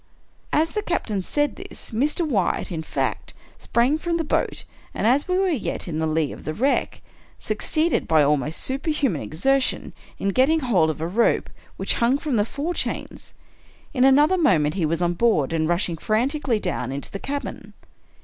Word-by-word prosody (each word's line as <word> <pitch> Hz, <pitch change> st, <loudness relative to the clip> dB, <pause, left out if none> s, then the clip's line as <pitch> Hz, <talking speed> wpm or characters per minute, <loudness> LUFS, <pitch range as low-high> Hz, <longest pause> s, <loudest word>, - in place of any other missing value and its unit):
" -, -, -37 dB
As 315 Hz, +2 st, +2 dB
the 425 Hz, -, -2 dB
captain 220 Hz, -, -2 dB
said 290 Hz, +10 st, 0 dB
this, -, -, -7 dB
Mr. 295 Hz, +8 st, 0 dB
Wyatt, 200 Hz, -, 0 dB
in 165 Hz, -2 st, -3 dB
fact, 160 Hz, -, -3 dB, 0.2 s
sprang 255 Hz, +6 st, +1 dB
from 335 Hz, +1 st, -1 dB
the 330 Hz, -, -1 dB
boat, 300 Hz, -, -1 dB, 0.3 s
and, -, -, -1 dB
as 260 Hz, +6 st, +3 dB
we 365 Hz, 0 st, +1 dB
were 385 Hz, 0 st, +2 dB
yet 275 Hz, -, -2 dB
in 160 Hz, -2 st, -3 dB
the 160 Hz, -, 0 dB
lee 155 Hz, -2 st, 0 dB
of -, -, -10 dB
the 155 Hz, +2 st, -4 dB
wreck, 270 Hz, +5 st, 0 dB, 0.3 s
suc -, -, -3 dB
ceeded, 320 Hz, +2 st, +1 dB
by 155 Hz, -2 st, +4 dB
almost 150 Hz, +1 st, +1 dB
superhuman 270 Hz, -, 0 dB
exertion, 255 Hz, -, 0 dB, 0.2 s
in 195 Hz, -, -1 dB
getting 275 Hz, +9 st, +3 dB
hold 190 Hz, -, +2 dB
of 155 Hz, 0 st, -4 dB
a 165 Hz, -, -1 dB
rope 225 Hz, +7 st, +1 dB, 0.3 s
which -, -, +1 dB
hung 240 Hz, +4 st, +3 dB
from 285 Hz, -3 st, -2 dB
the 205 Hz, -2 st, +2 dB
fore 290 Hz, +9 st, -3 dB
chains. -, -, -5 dB, 0.6 s
In 255 Hz, -3 st, +2 dB
another 295 Hz, +7 st, +5 dB
mo 300 Hz, -, +4 dB
ment 150 Hz, 0 st, 0 dB
he 175 Hz, -5 st, 0 dB
was 165 Hz, +3 st, -1 dB
on 175 Hz, 0 st, +1 dB
board, 170 Hz, -, +2 dB
and 160 Hz, 0 st, 0 dB
rushing 175 Hz, -1 st, 0 dB
frantically 240 Hz, -, 0 dB
down 125 Hz, -, -3 dB
into 140 Hz, +1 st, -5 dB
the 195 Hz, -, -5 dB
cabin. 285 Hz, +5 st, -6 dB
235 Hz, 190 wpm, -23 LUFS, -, 0.6 s, another